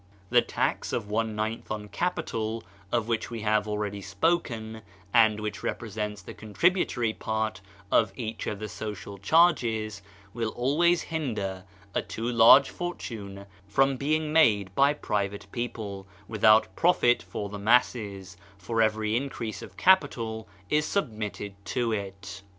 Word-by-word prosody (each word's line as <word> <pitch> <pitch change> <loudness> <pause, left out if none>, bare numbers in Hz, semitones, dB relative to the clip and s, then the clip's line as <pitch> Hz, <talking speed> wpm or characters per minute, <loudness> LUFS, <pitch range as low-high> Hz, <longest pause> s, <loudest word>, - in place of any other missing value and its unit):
The - - +6
tax - - -2
of 105 - -3
one 110 0 0
ninth 110 +1 -3
on 105 -1 -4
capital, 115 -8 -2 0.3
of 115 -2 0
which 115 -2 -1
we 115 -2 -5
have 105 0 +1
already 105 -1 -3
spoken, 110 - -1 0.3
and 110 -2 +5
which 105 0 -4
represents 105 -2 -4
the - - -9
contributory 120 - +1
part 110 -2 -2 0.3
of 110 -3 +4
each 115 -3 -5
in 105 - -2
the 105 +1 -5
social 100 0 -7
charges, 110 - +2 0.3
will 115 -2 -2
always 160 +7 +2
hinder 105 - -3 0.3
a - - +1
too 115 - -6
large 120 +4 +7
fortune 105 - -6 0.2
from 135 +7 +3
being 150 +3 0
made 105 - +4
by 140 +6 +4
private 100 -6 -2
people, 105 -5 -5 0.2
without 110 0 +4
profit 165 -8 +3
for 100 - -5
the 105 0 -7
masses, 100 -4 +1 0.2
for 115 +4 -1
every 110 0 +1
increase 115 -5 -3
of - - -11
capital 115 -12 +2 0.2
is 150 0 +2
submitted 110 - -3
to 120 +4 -1
it. 100 -1 -5
110 Hz, 140 wpm, -27 LUFS, 105-120 Hz, 0.3 s, large